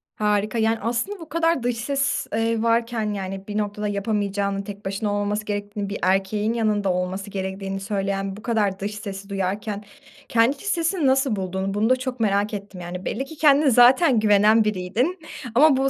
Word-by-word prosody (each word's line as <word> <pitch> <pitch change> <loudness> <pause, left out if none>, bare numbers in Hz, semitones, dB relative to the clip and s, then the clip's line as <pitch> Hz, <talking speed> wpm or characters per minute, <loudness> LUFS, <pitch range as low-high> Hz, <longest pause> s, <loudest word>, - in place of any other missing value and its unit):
Harika, 210 +1 0
yani, 225 0 +2
aslında 240 - -2
bu 325 - -10
kadar 330 -4 +1
dış 245 -1 0
ses, 275 +4 -1
eee, 225 0 +1
varken, 230 -2 +1
yani, 195 0 -5
bir 210 0 -3
noktada 210 0 -2
yapamayacağını, 200 -1 -1
tek 200 +1 -9
başına 200 +2 -2
olmaması 205 +1 -1
gerektiğini, 205 0 -4
bir 205 - -3
erkeğin 195 +4 +1
yanında 210 -4 +1
olması 185 +2 -3
gerektiğini 195 0 -4
söyleyen 195 -1 -2
bu - - -11
kadar 210 -5 0
dış 205 +1 -4
sesi 200 -1 -7
duyarken 200 +2 -3 0.5
kendi 235 +4 +3
iç - - -14
sesini 340 -4 0
nasıl 265 -3 +2
bulduğunu 190 +1 -3
bunu 215 +3 +1
da 255 - +5
çok 255 -1 -5
merak 205 0 +1
ettim, 200 -3 -7
yani. 180 +2 -6
Belli 265 +5 -2
ki 320 - -11
kendine 290 -1 +5
zaten 250 +2 +6
güvenen 215 +1 +5
biriydin. 215 - -1 0.4
Ama 285 0 +6
bu 270 0 +2
210 Hz, 175 wpm, -23 LUFS, 195-235 Hz, 0.5 s, zaten